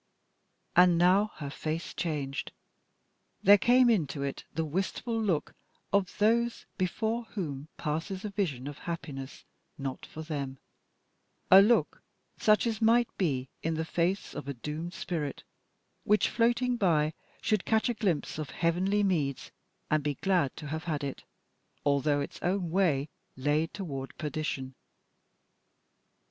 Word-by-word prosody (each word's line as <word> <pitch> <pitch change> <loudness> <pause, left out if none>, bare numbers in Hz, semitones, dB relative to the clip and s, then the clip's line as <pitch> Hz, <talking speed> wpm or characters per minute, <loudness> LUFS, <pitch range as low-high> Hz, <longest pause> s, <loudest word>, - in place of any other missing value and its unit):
And 180 -1 +6
now 185 +4 +5
her 140 -3 -6
face 155 +3 -4
changed. 145 -5 -3 0.9
There 205 +1 +8
came 250 +4 +5
into 155 -11 +1
it 140 -1 -4
the 160 +1 -1
wistful 195 - -2
look 185 -8 0 0.4
of 200 -2 +1
those 235 +3 +2
before 220 +5 -1
whom 155 -10 -5
passes 170 +6 -3
a 210 - -3
vision 150 - -2
of 145 0 -7
happiness 140 -5 -6 0.3
not 135 -2 -5
for 160 - -8
them, 140 -4 -4 0.9
a 190 +1 +11
look 230 +4 +3 0.3
such 215 +1 +3
as 225 -1 -1
might 235 +2 +4
be 135 -8 0
in 165 0 -1
the 160 0 -2
face 175 +4 -1
of - - -6
a 140 - -3
doomed 155 +7 -5
spirit 155 -6 -3 0.6
which, 210 +1 +3
floating 240 +1 +2
by, 160 -6 +2 0.3
should 215 -3 +1
catch 220 +1 +2
a 240 - +1
glimpse 180 -9 -1
of 150 - -4
heavenly 185 +5 +1
meads, 150 -9 0 0.4
and 155 -1 +3
be 145 -1 -1
glad 180 -7 +1
to - - -8
have 160 +2 -4
had 150 -4 -2
it, 140 -1 -4 0.6
although 145 0 +2
its 140 - -6
own 180 -1 0
way 160 -7 +2 0.3
lay 145 +4 +1
toward 140 -9 -6
perdition. 150 -3 -3
170 Hz, 140 wpm, -30 LUFS, 145-200 Hz, 0.9 s, a